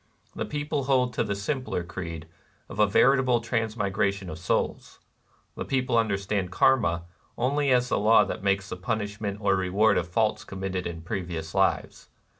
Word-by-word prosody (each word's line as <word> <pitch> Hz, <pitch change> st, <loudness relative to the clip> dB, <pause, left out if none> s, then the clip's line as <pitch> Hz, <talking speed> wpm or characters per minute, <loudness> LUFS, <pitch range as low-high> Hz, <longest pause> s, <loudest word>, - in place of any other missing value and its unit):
The -, -, -2 dB
people 145 Hz, -1 st, -2 dB
hold 130 Hz, -2 st, +2 dB
to -, -, 0 dB
the 100 Hz, -, -2 dB
simpler 115 Hz, -2 st, -2 dB
creed 85 Hz, -2 st, -6 dB, 0.4 s
of 100 Hz, -, -8 dB
a 105 Hz, -, +5 dB
veritable 130 Hz, +3 st, +4 dB
transmigration 105 Hz, -5 st, -1 dB
of 80 Hz, -, -8 dB
souls. 90 Hz, -, -2 dB, 0.6 s
The -, -, -5 dB
people 130 Hz, -2 st, 0 dB
understand 100 Hz, -3 st, 0 dB
Karma 95 Hz, -8 st, +3 dB, 0.3 s
only 140 Hz, +3 st, +1 dB
as 125 Hz, -1 st, +3 dB
the -, -, +1 dB
law 110 Hz, +2 st, +6 dB
that -, -, -5 dB
makes 100 Hz, 0 st, 0 dB
the -, -, -5 dB
punishment 100 Hz, +1 st, -3 dB
or 100 Hz, -1 st, +3 dB
reward 100 Hz, +3 st, +3 dB
of 85 Hz, -, -4 dB
faults 110 Hz, +4 st, 0 dB
committed 95 Hz, -2 st, -4 dB
in 85 Hz, -1 st, -7 dB
previous 85 Hz, -4 st, -4 dB
lives. -, -, 0 dB
100 Hz, 160 wpm, -26 LUFS, 95-120 Hz, 0.6 s, law